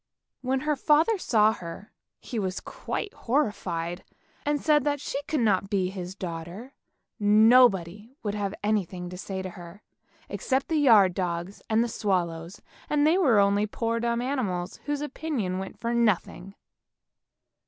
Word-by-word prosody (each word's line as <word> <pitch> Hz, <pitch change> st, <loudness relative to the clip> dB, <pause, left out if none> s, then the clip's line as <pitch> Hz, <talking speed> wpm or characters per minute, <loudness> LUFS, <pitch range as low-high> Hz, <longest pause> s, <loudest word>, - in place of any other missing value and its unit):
When 260 Hz, +1 st, -1 dB
her 300 Hz, +1 st, 0 dB
father 315 Hz, +10 st, +3 dB
saw 220 Hz, -8 st, +3 dB
her, 180 Hz, +3 st, -9 dB, 0.3 s
he 235 Hz, -, -5 dB
was 190 Hz, -2 st, -2 dB
quite 405 Hz, -, -5 dB
horrified 185 Hz, -, -2 dB, 0.4 s
and 295 Hz, 0 st, +1 dB
said 300 Hz, -2 st, +3 dB
that 290 Hz, 0 st, 0 dB
she 275 Hz, 0 st, -4 dB
could 305 Hz, -4 st, 0 dB
not 195 Hz, -3 st, +2 dB
be 190 Hz, -2 st, 0 dB
his 185 Hz, -1 st, -6 dB
daughter. 180 Hz, +7 st, -7 dB, 0.5 s
Nobody 210 Hz, -1 st, +4 dB
would 205 Hz, -2 st, -2 dB
have 205 Hz, -1 st, -3 dB
anything 185 Hz, -4 st, -1 dB
to 180 Hz, -, -7 dB
say 190 Hz, -1 st, -5 dB
to 185 Hz, -, -5 dB
her, 175 Hz, +3 st, -12 dB, 0.4 s
except 265 Hz, 0 st, -1 dB
the 320 Hz, -, +1 dB
yard 215 Hz, -10 st, +6 dB
dog, 175 Hz, 0 st, -3 dB, 0.2 s
and 225 Hz, +1 st, +3 dB
the -, -, -1 dB
swallows, 180 Hz, -5 st, -2 dB, 0.3 s
and 295 Hz, -1 st, +2 dB
they 330 Hz, +5 st, +4 dB
were 265 Hz, -, +4 dB
only 200 Hz, +1 st, +3 dB
poor 230 Hz, +2 st, -2 dB
dumb 235 Hz, +1 st, -1 dB
animals 205 Hz, -10 st, -2 dB
whose 290 Hz, -1 st, -2 dB
opinion 275 Hz, -11 st, -3 dB
went 190 Hz, -, -7 dB
for 235 Hz, 0 st, -2 dB
nothing. 200 Hz, -4 st, 0 dB
210 Hz, 155 wpm, -27 LUFS, 185-260 Hz, 0.5 s, yard